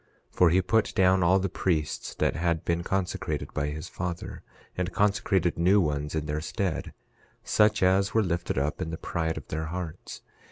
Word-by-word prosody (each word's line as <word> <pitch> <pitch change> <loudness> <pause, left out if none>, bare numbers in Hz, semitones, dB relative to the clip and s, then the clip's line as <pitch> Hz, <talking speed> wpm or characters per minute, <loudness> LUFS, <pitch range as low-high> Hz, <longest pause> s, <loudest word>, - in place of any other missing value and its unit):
11:5 - - -28
For 90 - +5
he 90 +3 +4
put 110 +4 +1
down 95 0 +4
all 90 +2 +5
the 95 0 0
priests 80 -6 -2
that - - 0
had 85 -1 0
been 85 0 0
consecrated 95 0 -2
by 70 - -1
his 75 +1 -5
father, 90 -1 -5 0.3
and 90 0 -2
consecrated 100 -4 +1
new 95 +4 +5
ones 75 -3 -1
in 80 -1 -1
their 75 +1 -2
stead, 90 -1 -3 0.5
such 105 -1 +3
as 95 +1 +3
were 110 - +3
lifted 85 -4 -2
up 75 +6 -1
in 80 - -2
the 80 - -4
pride 80 -1 -2
of - - -9
their 80 +1 -3
hearts. 85 -1 -6
85 Hz, 190 wpm, -27 LUFS, 80-95 Hz, 0.5 s, For